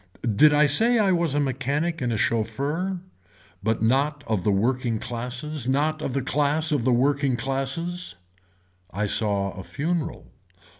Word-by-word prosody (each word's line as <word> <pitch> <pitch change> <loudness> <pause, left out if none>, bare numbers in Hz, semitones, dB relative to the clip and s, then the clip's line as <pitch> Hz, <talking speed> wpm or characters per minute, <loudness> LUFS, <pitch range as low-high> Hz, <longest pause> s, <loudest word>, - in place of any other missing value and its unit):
Did 150 +7 +6
I 150 +1 +4
say 230 +10 +4
I 205 -3 +3
was 170 -5 +1
a - - +2
mechanic 145 +5 -1
and 120 -1 -1
a 110 - -1
chauffeur 140 - -1 0.6
but 110 +2 -1
not 140 +5 +1
of 110 -5 -1
the - - +1
working 120 +3 0
classes 125 +4 -3
not 150 +3 0
of 135 - -3
the 135 -1 -1
class 150 +4 +1
of 145 -6 0
the 130 - +3
working 135 +1 +1
classes. 135 - -2 0.7
I 105 +2 -2
saw 100 -2 +2
a 95 - -9
funeral. 160 - -4
135 Hz, 155 wpm, -24 LUFS, 120-155 Hz, 0.7 s, Did